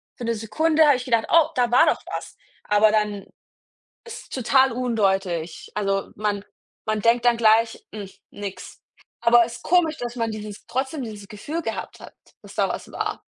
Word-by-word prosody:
für 240 - -7
'ne 230 0 0
Sekunde 310 +9 +2
habe 290 -3 +5
ich 250 - -7
gedacht: 230 -3 +2
„Oh, 325 -2 +5
da 245 -1 +1
war 250 - +6
doch - - +1
was.“ - - -6 0.3
Aber 210 +1 +4
dann 210 -2 0 0.8
ist 465 0 -10
total 260 +1 +3
undeutlich. 195 -9 -1
Also, 195 -1 -1
man 205 -1 -2 0.4
man 215 0 -1
denkt 235 +2 +3
dann 240 -1 +5
gleich: 225 0 +3
„Mhm, 205 -3 -7 0.2
nix.“ 200 -2 -8 0.4
Aber 235 0 +6
ist 235 +1 -9
komisch, 325 -3 +2
dass 240 0 -5
man 230 -2 -1
dieses 210 -1 -8
trotzdem 265 +2 -2
dieses 210 -3 -8
Gefühl 260 +10 -5
gehabt - - -5
hat, - - -12 0.3
dass - - -14
da - - +1
was - - -5
war. - - -3
230 Hz, 175 wpm, -23 LUFS, 210-255 Hz, 0.8 s, war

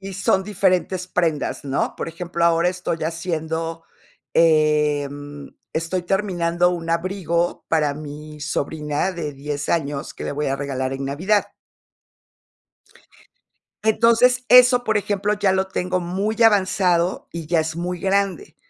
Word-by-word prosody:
Y 195 0 -7
son 190 0 +1
diferentes 185 -2 0
prendas, 165 -7 -1
¿no?, 135 0 -1
por - - -4
ejemplo, 170 +1 -3
ahora 170 +1 +3
estoy 180 -2 -3
haciendo, 165 0 -3 0.5
em, 145 -3 +1 0.2
estoy 165 +3 -2
terminando 175 -2 +1
un 170 -2 -4
abrigo 170 0 -1
para 150 -3 +1
mi 150 +1 -9
sobrina 150 +3 -2
de 155 -4 -4
10 145 +1 -5
años 145 -4 -2
que - - -9
le - - -3
voy 150 +1 -2
a 135 0 0
regalar 135 -2 -3
en 135 0 -4
Navidad. 185 +10 +1 2.4
Entonces, 235 +3 +4
eso, 250 0 +7
por 220 -1 +2
ejemplo, 205 +1 -1
ya 205 -2 +1
lo 190 0 0
tengo 185 -1 -1
muy 200 +6 -1
avanzado 185 -4 +2
y 170 -2 -6
ya 165 0 +2
es 160 0 -3
muy 175 +1 -3
grande. 200 - -1
170 Hz, 135 wpm, -22 LUFS, 150-190 Hz, 2.4 s, eso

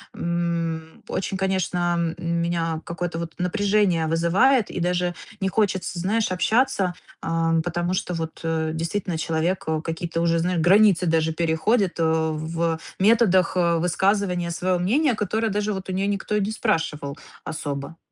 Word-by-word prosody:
м, 170 -2 -2
очень, 190 0 -2
конечно, 180 -2 0 0.2
м 170 -1 -1
меня 165 -1 -1
какое-то 170 0 -4
вот 165 -1 -5
напряжение 195 -2 +2
вызывает, 190 +10 +3
и - - -4
даже 180 0 0 0.3
не 190 -2 0
хочется, 190 -4 0
знаешь, 210 +3 0
общаться, 200 -1 +1 0.3
а, 165 0 0
м, 165 0 +3
потому 175 +2 -2
что 180 -1 -2
вот, 160 -1 -5
э, 160 -1 -1
действительно 170 +1 -2
человек, 165 +3 -1
э, 160 -1 0
какие-то 165 0 -3
уже, 170 0 +2
знаешь, 175 +1 0
границы 185 +1 +5
даже 160 -1 +2
переходит, 170 +5 +1
э, - - +3
в 160 +1 0 0.2
методах, 195 -4 +4
э, 170 -2 +3
высказывания 180 +1 +1
своего 180 +1 0
мнения, 255 - +2
которое 215 +2 -1
даже 210 +1 -1
вот 190 0 -6
у - - -1
нее 195 +1 0
никто 205 +1 -1
и 210 - +2
не 200 +2 -1
спрашивал 160 -10 -1 0.3
особо. 145 0 -5
175 Hz, 155 wpm, -24 LUFS, 165-195 Hz, 0.3 s, границы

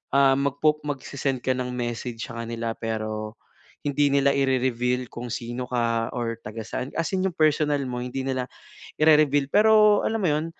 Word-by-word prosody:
ah, 135 -1 +5
magpo 145 +2 +1
magse-send 135 -2 -3
ka 130 - +2
ng 125 0 -3
message 120 -1 -4
sa 115 -1 -5
kanila 115 0 -3
pero 110 -1 -4 0.5
hindi 145 0 +2
nila 140 0 +4
i-re-reveal 125 -2 0
kung 120 +1 -7
sino 120 +1 -4
ka 115 -2 0
or 115 -2 -3
taga-saan, 110 +4 -5
as 165 - 0
in 185 - 0
yung 185 - -4
personal 150 -2 +2
mo 125 - -4
hindi 125 +2 -4
nila 130 -1 -1 0.5
i-re-reveal. 150 -2 +4
Pero 210 0 +6
alam 225 - 0
mo 185 - +2
'yon 155 +2 -1
130 Hz, 165 wpm, -25 LUFS, 120-145 Hz, 0.5 s, Pero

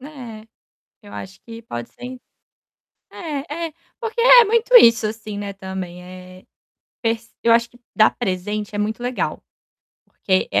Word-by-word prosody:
É, 245 -6 -10 0.6
eu 205 -1 -14
acho 190 0 -9
que 230 0 -10
pode 120 - -7
ser 250 +1 -9 0.9
é 310 0 -5
é, - - -18 0.3
porque 460 0 -3
é - - +9
muito 465 +3 +1
isso, 230 - +7
assim, 215 -1 -6
né, 200 -1 -5
também 190 -2 -7
é 185 0 -12 0.6
pes 230 -1 -2
eu 230 0 +5
acho 235 0 +3
que 245 - -21 0.2
dar 215 - +5
presente 210 0 -3
é - - -2
muito 215 +3 -2
legal, 245 0 -2 0.6
porque 185 -1 0
é 100 - +3
225 Hz, 155 wpm, -21 LUFS, 195-255 Hz, 0.9 s, é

